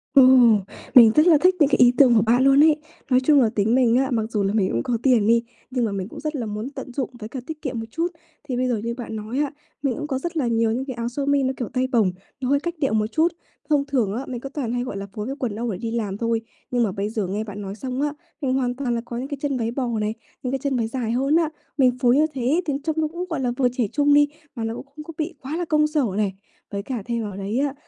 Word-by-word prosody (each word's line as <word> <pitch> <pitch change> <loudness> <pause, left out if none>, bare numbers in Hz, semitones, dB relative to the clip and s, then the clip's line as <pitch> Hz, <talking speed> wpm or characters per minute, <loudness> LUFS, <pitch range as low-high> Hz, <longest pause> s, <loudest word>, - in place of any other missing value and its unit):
Ừm, 255 -5 +7 0.3
mình 235 -3 +10
rất 305 +3 +5
là 325 -3 +7
thích 365 +1 +5
những 295 -3 +5
cái - - +3
ý 245 -1 +7
tưởng 255 -4 +6
của 220 - +5
bạn 235 +4 +3
luôn 275 +2 +6
ấy. 310 -1 +6 0.3
Nói 255 -1 +5
chung 280 +2 +4
là 230 - +3
tính 220 +3 +2
mình 245 -3 +4
á, 265 +1 +1
mặc 225 -2 -1
dù 210 -3 0
là 195 +1 0
mình 205 -4 +2
cũng 115 - -1
có 240 - 0
tiền 240 -6 +4
đi, 230 +1 +4 0.3
nhưng 250 -2 0
mà 215 - -2
mình 195 -2 -3
cũng - - -10
rất 305 0 -3
là 245 -5 -2
muốn 210 +4 -4
tận 270 -2 -8
dụng 265 -1 -2
với 215 -1 -7
cả 260 - -5
tiết 315 -1 -7
kiệm 260 -6 -3
một 225 - -5
chút. 335 +1 0 0.4
Thì 270 -4 -4
bây 255 +1 +1
giờ 245 -2 +1
như 230 +3 -3
bạn 235 -2 -6
nói 220 +5 -4
á, 290 -2 0 0.3
mình 265 -4 +1
cũng 295 - -4
có 265 -3 -2
rất 340 +3 -4
là 270 -6 +1
nhiều 230 -1 +2
những 255 +4 -2
cái 265 - -4
áo 235 0 -3
sơ 275 +3 -3
mi 285 -1 +2
nó 260 0 0
kiểu 245 - -4
tay 255 -1 +1
bổng, 220 -7 +3 0.3
nó 255 - -1
hơi 285 +1 +3
cách 345 +3 -3
điệu 275 -6 +1
một 215 -1 +2
chút. 320 +2 +3 0.4
Thông 290 -2 +3
thường 250 -8 0
á, 250 +5 -4
mình 245 -2 -5
cứ 275 - -6
toàn 270 -5 -3
hay, 245 0 -1
gọi 250 -5 -5
là, 195 - -5
phối 210 0 -4
với 270 +3 -4
quần 235 -6 -2
âu 235 +1 -2
để 190 - -4
đi 225 +4 -4
làm 210 -4 -2
thôi, 230 0 0 0.3
nhưng 245 -1 +2
mà 210 - 0
bây 200 +2 -3
giờ 215 -3 -2
nghe 205 +4 -2
bạn 205 -1 -7
nói 195 0 -6
xong 255 +4 -4
á, 295 0 0 0.3
mình 260 -3 0
hoàn 250 -2 0
toàn 250 -3 -1
là 230 - -2
có 235 - -6
những 255 +3 -4
cái 285 0 -5
chân 280 -3 -1
váy 230 -1 -1
bò 255 0 -2
này, 210 0 -1 0.3
những 250 - -2
cái 270 - -1
chân 260 -4 -1
dài 230 -1 -3
hơn 270 +5 +2
á. 330 -2 +3 0.3
Mình 260 -3 +5
phối 245 0 +4
như 305 +2 +4
thế 270 +6 +1
thì 295 - -1
trông 315 0 -1
nó 310 - +1
cũng, 345 +3 -5
gọi 330 -4 -2
là, 250 -2 0
vừa 255 - +3
trẻ 245 -2 -1
trung 290 -1 +3
đi, 290 0 +6 0.3
mà 230 - -4
nó 225 0 -2
cũng - - -8
không 305 - -8
có 330 - -9
bị 320 +2 -2
quá 285 +4 -4
là 350 - -2
công 305 -1 +3
sở 300 -3 +1
này. 205 -2 0 0.4
Với 200 -1 -3
cả 240 -3 -4
thêm 235 -1 -2
vào 205 -3 -6
đấy 200 +5 -2
á, 280 -1 0
250 Hz, 310 wpm, -23 LUFS, 225-280 Hz, 0.4 s, mình